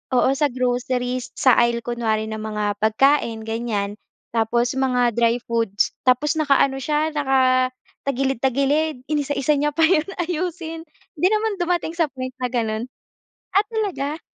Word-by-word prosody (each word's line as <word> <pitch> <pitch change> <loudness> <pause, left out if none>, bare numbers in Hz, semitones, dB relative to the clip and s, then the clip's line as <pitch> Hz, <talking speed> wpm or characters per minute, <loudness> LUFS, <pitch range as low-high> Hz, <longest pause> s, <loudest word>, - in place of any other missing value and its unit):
Oo, 260 +2 +4
sa 290 +2 +2
groceries 250 0 -1
sa 260 - +5
aisle 235 -1 +2
kunwari 225 -3 -1
ng 220 0 -5
mga 210 -1 -2
pagkain, 225 0 +2
ganyan. 225 -3 -2 0.4
Tapos 235 +2 +1
mga 250 -2 +2
dry 235 +1 +2
foods 230 -4 0 0.2
tapos 255 +4 +3
naka-ano 275 -2 +3
siya, 300 +3 0
nakatagilid-tagilid, 270 +1 0
inisa-isa 290 0 +1
niya 295 0 0
pa 325 - +3
'yon 320 -1 +3 0.2
ayusin. 330 -1 -4 0.3
'Di 360 - +4
naman 430 -1 0
dumating 350 -2 0
sa 335 -2 +1
point 255 -2 -6
na 250 - 0
gano'n? 230 -1 -2 0.7
Ah, 400 +2 +4
talaga? 375 -9 -2
255 Hz, 135 wpm, -22 LUFS, 235-300 Hz, 0.7 s, sa